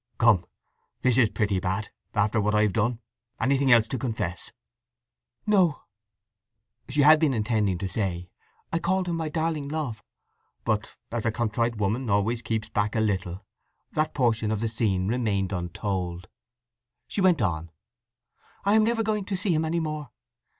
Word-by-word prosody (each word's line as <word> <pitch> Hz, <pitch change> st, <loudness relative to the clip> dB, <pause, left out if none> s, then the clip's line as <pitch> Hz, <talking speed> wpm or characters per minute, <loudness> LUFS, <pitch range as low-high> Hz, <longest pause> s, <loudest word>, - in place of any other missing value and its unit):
"Come—this 115 Hz, +3 st, 0 dB
is 120 Hz, -4 st, +5 dB
pretty 100 Hz, -4 st, 0 dB
bad, 95 Hz, +4 st, -2 dB, 0.3 s
after 105 Hz, +1 st, +2 dB
what 105 Hz, +1 st, +1 dB
I've 105 Hz, -2 st, +3 dB
done! 115 Hz, +2 st, +1 dB, 0.4 s
Anything 135 Hz, +2 st, +2 dB
else 115 Hz, -2 st, +6 dB
to 130 Hz, -, -2 dB
confess?" 110 Hz, -8 st, -3 dB, 0.9 s
"No." 185 Hz, -8 st, +3 dB, 1.1 s
She 145 Hz, +3 st, +2 dB
had 155 Hz, +2 st, +7 dB
been 150 Hz, -5 st, +2 dB
intending 105 Hz, -4 st, +1 dB
to 95 Hz, -, -3 dB
say: 90 Hz, -3 st, -2 dB, 0.5 s
"I 165 Hz, -, +2 dB
called 185 Hz, +2 st, 0 dB
him 170 Hz, -, -1 dB
my 160 Hz, -2 st, -2 dB
darling 160 Hz, -2 st, -1 dB
Love." 140 Hz, -10 st, -3 dB, 0.6 s
But, 110 Hz, 0 st, -1 dB
as 115 Hz, -1 st, -2 dB
a 115 Hz, -, +1 dB
contrite 115 Hz, 0 st, -1 dB
woman 110 Hz, +5 st, -1 dB
always 105 Hz, +4 st, +1 dB
keeps 110 Hz, -2 st, -2 dB
back 105 Hz, +1 st, 0 dB
a -, -, +2 dB
little, 95 Hz, -3 st, -1 dB, 0.5 s
that 155 Hz, 0 st, -1 dB
portion 115 Hz, -5 st, +1 dB
of 110 Hz, -1 st, 0 dB
the 115 Hz, -, 0 dB
scene 100 Hz, -5 st, 0 dB
remained 105 Hz, -5 st, 0 dB
untold. 90 Hz, 0 st, -3 dB, 0.8 s
She 200 Hz, -, -2 dB
went 180 Hz, -4 st, +4 dB
on: 85 Hz, -5 st, -1 dB, 1.0 s
"I 200 Hz, -, +4 dB
am 220 Hz, 0 st, +5 dB
never 225 Hz, 0 st, +1 dB
going 210 Hz, -2 st, -1 dB
to 195 Hz, -1 st, -2 dB
see 185 Hz, -1 st, +1 dB
him 155 Hz, 0 st, +1 dB
any 165 Hz, +2 st, 0 dB
more. 155 Hz, -4 st, -4 dB
115 Hz, 155 wpm, -26 LUFS, 100-150 Hz, 1.1 s, had